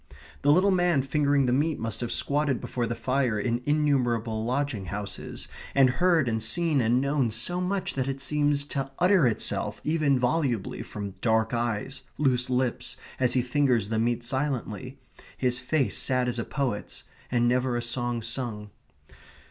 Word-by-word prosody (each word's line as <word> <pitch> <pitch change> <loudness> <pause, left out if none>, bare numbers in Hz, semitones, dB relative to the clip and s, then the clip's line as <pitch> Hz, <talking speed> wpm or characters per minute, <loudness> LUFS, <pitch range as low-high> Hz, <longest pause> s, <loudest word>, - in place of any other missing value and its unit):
The 145 - +4
little 185 +6 +4
man 175 -6 +2
fingering 140 0 +2
the 125 - +2
meat 150 +3 +1
must 115 0 -4
have 120 - -3
squatted 145 -3 0
before 120 -2 -3
the 120 - -2
fire 125 -1 0
in 120 +1 -1
innumerable 120 -7 +1
lodging 125 -4 -1
houses, 100 +1 -6 0.3
and 135 -2 +6
heard 170 -6 +4
and 110 -1 0
seen 150 +5 +1
and 120 +2 +3
known 140 -2 +1
so 120 +12 -3
much 190 +1 -1
that 130 -1 -1
it 135 0 -3
seems 145 0 +1
to 135 -1 -2
utter 180 -6 +4
itself 105 -2 -1
even 150 -3 +2
volubly 125 -4 0
from 100 -1 -6
dark 110 0 +2
eyes, 120 +3 -2 0.2
loose 130 -3 +1
lips, 125 -1 -1 0.2
as 125 -2 +3
he 125 - +2
fingers 125 -5 +1
the 110 -1 0
meat 120 +1 0
silently, 130 -1 -3 0.4
his 125 -1 +1
face 135 +2 0
sad 125 -1 +1
as 120 -1 0
a - - -1
poet's, 130 -7 -3 0.3
and 120 -1 +2
never 125 0 +1
a - - -1
song 120 -1 -2
sung. 115 -3 -4
125 Hz, 165 wpm, -27 LUFS, 115-145 Hz, 0.4 s, and